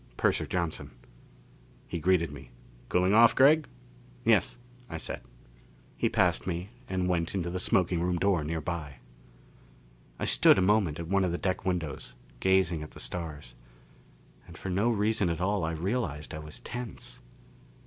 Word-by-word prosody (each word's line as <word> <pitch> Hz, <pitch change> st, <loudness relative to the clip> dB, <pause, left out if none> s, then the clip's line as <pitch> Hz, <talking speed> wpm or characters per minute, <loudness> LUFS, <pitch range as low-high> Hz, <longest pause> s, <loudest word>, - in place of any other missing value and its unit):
Purser -, -, +1 dB
Johnson. 85 Hz, -3 st, -2 dB, 1.0 s
He 85 Hz, -, -4 dB
greeted 85 Hz, -2 st, +2 dB
me. 75 Hz, -, -11 dB, 0.4 s
"Cooling 90 Hz, +2 st, +3 dB
off, 115 Hz, +1 st, +7 dB
Gregg?" 150 Hz, +4 st, +5 dB, 0.6 s
"Yes," -, -, +3 dB, 0.3 s
I 80 Hz, -, -4 dB
said. -, -, -5 dB, 0.7 s
He -, -, +1 dB
passed -, -, +1 dB
me 90 Hz, +3 st, -3 dB, 0.2 s
and 90 Hz, -1 st, 0 dB
went 85 Hz, 0 st, 0 dB
into 85 Hz, -2 st, -2 dB
the 90 Hz, -, -3 dB
smoking 90 Hz, -1 st, +2 dB
room 90 Hz, 0 st, 0 dB
door 95 Hz, -3 st, +2 dB
nearby. 80 Hz, -2 st, -4 dB, 1.2 s
I -, -, -2 dB
stood -, -, +6 dB
a -, -, +3 dB
moment 95 Hz, -6 st, +2 dB
at 85 Hz, -, -5 dB
one 100 Hz, +2 st, +2 dB
of 90 Hz, -, 0 dB
the 85 Hz, -, -1 dB
deck 95 Hz, -1 st, -2 dB
windows, 80 Hz, -8 st, -3 dB, 0.2 s
gazing 95 Hz, -4 st, +2 dB
at 75 Hz, -, -7 dB
the -, -, -13 dB
stars; 75 Hz, -8 st, -5 dB, 0.9 s
and -, -, -12 dB
for 95 Hz, -, -5 dB
no 100 Hz, +6 st, +2 dB
reason 105 Hz, -3 st, +1 dB
at 85 Hz, -1 st, -2 dB
all 100 Hz, 0 st, 0 dB
I 80 Hz, +1 st, -1 dB
realized 80 Hz, -, -2 dB
I 80 Hz, -, -5 dB
was 75 Hz, 0 st, -8 dB
tense. 120 Hz, -3 st, -7 dB
90 Hz, 160 wpm, -29 LUFS, 80-95 Hz, 1.2 s, off